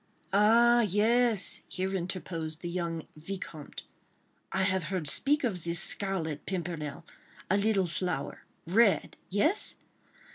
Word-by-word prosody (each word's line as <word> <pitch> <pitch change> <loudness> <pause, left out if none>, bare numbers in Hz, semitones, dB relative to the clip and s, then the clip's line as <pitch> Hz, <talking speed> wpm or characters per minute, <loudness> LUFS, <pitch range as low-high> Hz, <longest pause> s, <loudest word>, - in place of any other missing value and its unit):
"Ah, 230 +4 +6
yes," 220 0 +2
here 190 +1 -3
interposed 170 -3 -4
the 175 - -4
young 170 -2 -3
Vicomte, 160 -2 -7 0.7
"I 190 0 +1
have 190 -3 +1
heard 175 -2 -2
speak 285 - +1
of 190 -9 0
this 170 0 -1
Scarlet 165 -8 -2
Pimpernel. 165 -5 -4 0.5
A 200 - +4
little 200 -2 +2
flower—red?—yes! 195 - 0
185 Hz, 105 wpm, -30 LUFS, 170-210 Hz, 0.7 s, Ah